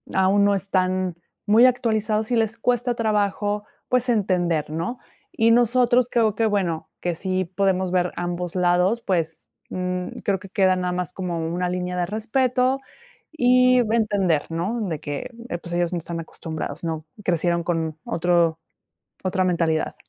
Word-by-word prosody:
aún 195 +2 +4
no 200 0 +3
están 185 -2 0 0.3
muy 220 +4 +6
actualizados, 220 -3 +1
y - - +3
les 225 0 0
cuesta 245 +1 +1
trabajo, 210 -2 0 0.3
pues 250 0 +1
entender, 175 -8 +1
¿no? 200 +11 -3 0.3
Y 225 +1 +3
nosotros 245 +1 +4
creo 220 -3 +2
que, 225 - +1
bueno, 190 -7 -1
que 175 -1 -1
sí 185 +1 -1
podemos 185 0 0
ver 180 -1 +1
ambos 175 0 -3
lados, 180 +5 +2
pues, 165 -6 -2 0.2
um 180 0 -3
creo 195 -2 0
que 190 0 -12
queda 190 -2 +3
nada 180 -1 -1
más, 180 -2 -3
como 180 -3 -3
una 175 +2 -1
línea 180 0 -3
de 175 - +1
respeto, 255 +5 +1 0.5
y 255 -3 +4
entender, 205 -8 +1
¿no? 185 +9 -2
De 160 -3 -3
que, 145 -1 -5 0.2
eh, 175 - -2
pues, 170 0 -7
ellos 175 0 0
no 175 - -1
están 170 +1 -5
acostumbrados, 160 -1 -6
¿no? 160 -2 -3 0.2
Crecieron 170 -1 +1
con 160 -2 -2
otro 170 -1 +1 0.6
otra 185 0 +1
mentalidad. 165 -3 0
185 Hz, 155 wpm, -23 LUFS, 175-220 Hz, 0.6 s, muy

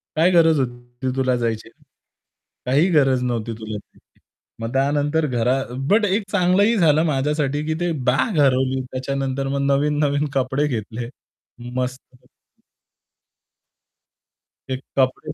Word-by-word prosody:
काय 170 +4 +4
गरज 165 -3 +4
होती 120 +1 -4
तुला 130 -1 +1
जायची? 115 -2 -2 1.0
काही 145 +9 +3
गरज 135 -5 +3
नव्हती 115 -2 -2
तुला. 110 -1 -5 0.8
मग 115 +2 -5
त्यानंतर 145 +3 +1
घरा 125 -1 +1 0.3
बट 210 +1 +4
एक 205 +2 +1
चांगलंही 200 +4 +3
झालं 160 -3 +4
माझ्यासाठी, 145 0 0
की 160 - -1
ती 175 0 0 0.2
बॅग 150 - +1
हरवली. 130 -1 +2
त्याच्यानंतर 135 +1 -2
मग 140 +1 -1
नवीन 145 +2 +1
नवीन 145 +1 +1
कपडे 135 +2 0
घेतले. 115 -1 -4 0.7
मस्तपैकी. 130 0 -5 2.4
एक 130 0 -4 0.2
कपडे 130 +3 0
135 Hz, 115 wpm, -21 LUFS, 125-150 Hz, 2.4 s, काय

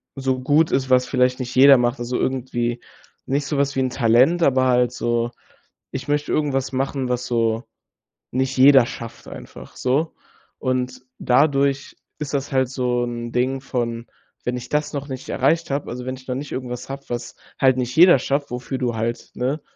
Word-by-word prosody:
so 130 -1 -1
gut 150 +5 +2
ist, 130 0 0
was 125 0 +4
vielleicht 125 0 +1
nicht 125 0 -5
jeder 135 +1 +8
macht.” 120 +1 0
Also 120 +1 -3
irgendwie 120 -2 -2 0.5
nicht 140 +2 -1
sowas 140 -2 0
wie 135 - +1
'n 130 - +1
Talent, 125 +10 +3
aber 130 -2 +3
halt 125 -1 +2
so: 120 0 -1 0.6
Ich 135 +2 -6
möchte 145 0 -1
irgendwas 140 -3 0
machen, 135 -1 -2
was 125 0 -1
so 115 -1 0 0.7
nicht 130 +1 -1
jeder 135 -2 +7
schafft. 115 -1 -9
einfach - - -11
so. 140 +6 0 0.4
Und 130 0 -2 0.2
dadurch 140 +1 +2 0.2
ist 150 -2 -5
das 140 0 -2
halt 130 -1 +2
so 125 -2 -1
'n 120 -1 -5
Ding 130 +2 0
von: 115 -3 -3 0.4
Wenn 125 - -2
ich 125 0 -8
das 150 +1 -1
noch 140 0 -4
nicht 130 -1 -7
erreicht 155 +5 +1
habe. 140 +1 -2
Also, 125 +1 -6
wenn 130 0 -3
ich 130 - -15
dann 125 0 -3
nicht 145 - -8
irgendwas 125 -1 -5
habe, 140 +1 -6
was 120 0 -5 0.2
halt 130 -1 +4
nicht 125 0 -2
jeder 175 -1 +8
schafft, 140 +2 -1
wofür 125 +2 -4
du 120 -3 -1
halt, 115 +2 -3
ne, 135 +5 -2
130 Hz, 185 wpm, -22 LUFS, 125-140 Hz, 0.7 s, jeder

